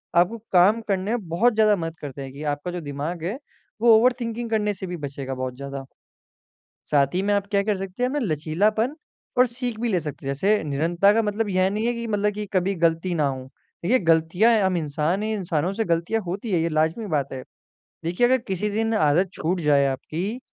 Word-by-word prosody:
आपको 180 +7 +3
काम 195 +5 +5
करने 195 +1 0
में 225 -7 -2
बहुत 220 +9 +3
ज़्यादा 215 -1 +4
मदद 165 -3 -5
करते 140 -1 -7
हैं 135 -1 -7
कि 145 - -8
आपका 145 +5 -5
जो 175 -1 -5
दिमाग 150 +4 -5
है 200 +9 -2 0.4
वो 230 -2 +7
ओवर 250 +3 +4
थिंकिंग 230 0 -3
करने 210 -2 +1
से 190 0 -7
भी 175 -1 -5
बचेगा 135 -2 -5
बहुत 130 -1 -4
ज़्यादा। 140 0 -6 1.1
साथ 140 0 +3
ही 185 - +1
में 205 +1 +1
आप 200 0 0
क्या 200 -1 +2
कर 210 0 0
सकते 190 +4 -6
हैं 250 - +2
ना, 295 - -1
लचीलापन 205 - 0 0.4
और 250 - +7
सीख 240 -1 -4
भी 240 - 0
ले 185 -5 +1
सकते 150 -3 -7
हैं। 140 - 0
जैसे 205 +7 +2
निरन्तता 170 +7 +2
का 225 +1 +2
मतलब 210 +1 -1
यह 185 0 +2
नहीं 215 +3 -1
है 240 - +2
कि 235 0 -4
मतलब 210 -1 0
कि 210 0 -4
कभी 195 +1 +1
गलती 165 +2 +1
ना 155 -3 +1
हो। 130 -2 -3 0.4
देखिए 245 +9 +3
गलतियाँ 165 +8 +4
हैं 220 -3 +3
हम 190 -1 +2
इंसान 160 +4 -1
हैं, 220 0 -1
इंसानों 175 -1 -1
से 225 +2 -1
गलतियाँ 170 +6 0
होती 195 +5 -4
हैं, 170 - +3
ये 165 - +1
लाजमि 160 +7 0
बात 140 -1 -2
है। 130 - -5 0.6
देखिए 175 +9 +2
अगर 260 +1 +3
किसी 195 +3 -1
दिन 225 +2 0
आदत 170 +1 +3
छूट 175 +3 -1
जाए 145 -2 +4
आपकी 170 - -3
185 Hz, 220 wpm, -24 LUFS, 155-215 Hz, 1.1 s, वो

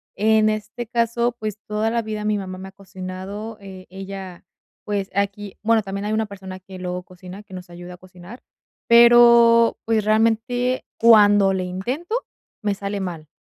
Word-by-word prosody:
En 215 0 +3
este 215 +2 -5
caso, 235 0 0
pues, 215 -1 -4
toda 215 +1 -1
la 235 0 0
vida 215 -1 -5
mi 210 0 +1
mamá 185 -2 -6
me 190 +1 -9
ha - - -17
cocinado, 195 +3 -8
eh, 190 -2 -11
ella, 190 -1 -9 0.4
pues 200 -2 -2
aquí, 200 0 -2
bueno, 225 0 +3
también 195 0 -5
hay 210 - -2
una 220 0 0
persona 190 -2 -9
que 185 0 -12
luego 180 0 -4
cocina, 185 +2 -12
que 190 - -16
nos 180 -1 -9
ayuda 175 +1 -10
a - - -18
cocinar, 185 +5 -14 0.4
pero, 235 0 +6
pues, 225 -1 +1
realmente 230 +4 +1 0.2
cuando 205 -3 +6
le 185 -1 -2
intento, 245 - -5 0.5
me 205 -2 -1
sale 200 +1 -4
mal, 170 -5 -6
205 Hz, 170 wpm, -21 LUFS, 190-225 Hz, 0.5 s, pero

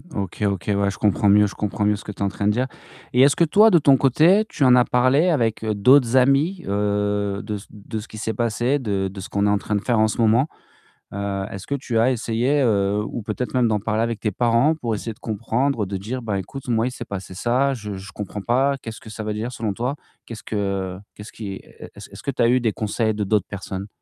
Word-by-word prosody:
OK, 100 -1 -4
OK 100 -3 -1
ouais, 100 0 +1
je - - -9
comprends 105 0 +2
mieux 105 +1 +5
je 100 - -9
comprends 105 0 -2
mieux 105 0 +3
ce 105 - -10
que - - -6
tu 100 - -12
en - - +2
train 100 +1 -2
de - - +4
dire. 125 +4 0 0.5
Et 125 - +4
est-ce 140 +1 +6
que - - +3
toi 210 +8 +6
de 175 - +5
ton 140 -2 +5
côté, 160 - +4
tu - - -1
en 125 -1 +7
as 125 - +6
parlé 130 +8 +3
avec 115 -8 0
d'autres 120 +4 +4
amis, 140 +8 +2
heu, 100 0 -1
de 105 0 -4
ce 100 - -12
de 110 +1 -7
ce 105 - -9
qui 110 - -11
s'est 110 +1 -3
passé, 120 +4 0
de 100 -6 -1
de 95 +1 -9
ce 95 - -8
qu'on 100 0 0
est - - +3
en 105 - +3
train 105 - -3
de 100 - 0
faire 120 0 +1
en 110 - +4
ce - - -4
moment? 115 +5 +3 0.7
Heu, 100 -1 -3
est-ce 95 - -8
que 140 - -1
tu 125 -4 -3
as 120 +3 +4
essayé, 125 +4 0
heu 105 -2 +1
ou 120 - -5
peut-être 115 +4 -4
même 125 -2 +3
d'en 105 -1 +1
parler 110 +2 -1
avec 115 -2 -2
tes 105 - -1
parents 120 - +2
pour 120 -7 -3
essayer 115 +2 -5
de - - -27
comprendre, 115 +2 -1
de 95 +1 -4
dire: 115 +7 -5
«Ben, 105 -3 -2
écoute, 130 +9 -7
moi, 115 0 +1
il - - -3
s'est 120 - -8
passé 95 -3 -7
ça, 125 +7 +1
je 105 -5 -6
je 95 +1 -9
comprends 105 0 -6
pas. 135 +6 +1
Qu'est-ce 115 -1 -8
que 110 - -12
ça 110 - -6
veut 105 0 -2
dire 115 +3 -4
selon 110 -4 -3
toi? 125 +7 -2 0.3
Qu'est-ce 115 -2 -9
que 100 -3 -3 0.2
qu'est-ce 105 +1 -10
qui». 100 -3 -6 0.4
Est-ce - - -11
que 140 - -1
tu - - -3
as 115 - +4
eu 125 +1 +4
des 110 -3 0
conseils 110 +1 -1
de 105 - -1
d'autres 105 -1 +1
personnes? 100 0 -6
110 Hz, 255 wpm, -22 LUFS, 100-125 Hz, 0.7 s, en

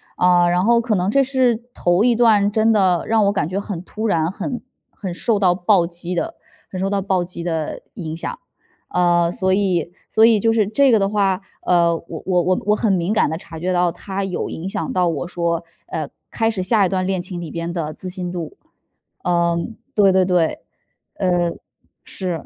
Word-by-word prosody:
啊， 180 -1 +4
然 175 +1 +2
后 235 +3 +4
可 235 -1 -1
能 185 0 0
这 275 +6 +4
是 255 -3 +1
头 175 +3 +2
一 240 0 +4
段， 215 -3 +4
真 220 +1 +3
的 190 -5 +3
让 220 -2 +3
我 200 - +3
感 185 -6 -1
觉 190 +2 -2
很 200 -4 -5
突 215 +4 -5
然， 165 -5 +1
很 245 +5 -4 0.3
很 190 -3 -6
受 215 +4 0
到 180 -3 +3
暴 175 -1 +3
击 175 +1 -6
的 175 - -2 0.4
很 185 - -5
受 190 - 0
到 200 0 0
暴 190 -2 0
击 175 -1 -7
的 160 -3 -3
影 160 -3 -5
响。 165 - -5 0.5
啊， 175 -1 +2
所 190 +1 0
以 185 -4 0 0.2
所 220 - +4
以 225 -2 +6
就 225 +2 +2
是 215 -3 +2
这 265 +6 +3
个 225 - +5
的 195 0 +1
话， 200 -2 +1 0.2
呃， 170 -1 +3
我 165 -1 -8
我 180 -2 +2
我 185 +2 +1
我 210 - +4
很 215 -2 +1
敏 180 +1 0
感 215 - +3
地 155 - -2
察 165 -2 -10
觉 180 +3 -1
到 175 -1 +2
他 195 +3 -5
有 190 -2 -3
影 175 +4 -5
响 165 - -3
到 180 -1 +2
我 165 +1 -3
说， 170 -1 -1 0.2
呃， 155 -2 -3 0.2
开 225 -1 0
始 205 -4 -3
下 205 +2 +4
一 - - 0
段 185 0 -1
恋 190 0 0
情 175 0 -5
里 165 - -6
边 170 +2 -4
的 160 -3 -3
自 185 - -9
信 180 -1 -4
度。 170 -3 -6 0.7
嗯， 170 +4 0 0.2
对 200 -2 +5
对 190 0 +4
对， 180 -3 +1 0.6
嗯， 175 -3 0 0.5
是。 180 -5 -4
185 Hz, 225 characters per minute, -20 LUFS, 175-205 Hz, 0.7 s, 以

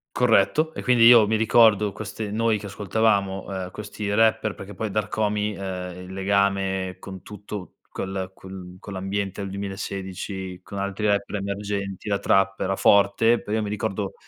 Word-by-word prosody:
Corretto 125 +7 +3
e - - -6
quindi 125 -2 +5
io 120 -3 +8
mi 110 +1 +1
ricordo 110 -2 +4
queste 105 0 -6
noi 110 0 +1
che 105 - -9
ascoltavamo, 100 -1 0
uhm, 95 -2 -5
questi 105 0 -5
rapper, 110 -1 +2
perché 100 +1 -9
poi 110 +3 -4
da 105 - +1
Rkomi, 105 -1 -1
uhm, 90 -2 -5
il 90 +1 -9
legame 95 -1 0
con 95 -2 -9
tutto 105 -2 -8 0.2
col 95 -1 -4
quel 95 -1 -10
con 100 - -10
l'ambiente 95 +1 -3
del 100 -1 -4
2016, 95 -1 -5
con 100 - -7
altri 100 +2 -3
rapper 100 0 0
emergenti, 100 0 -4
la 100 - +1
trap 95 0 +2
era 95 +1 0
forte, 100 +4 +4
poi 105 - -5
io 110 - +1
mi 105 - -3
ricordo 100 -1 -3
100 Hz, 170 wpm, -24 LUFS, 95-105 Hz, 0.2 s, io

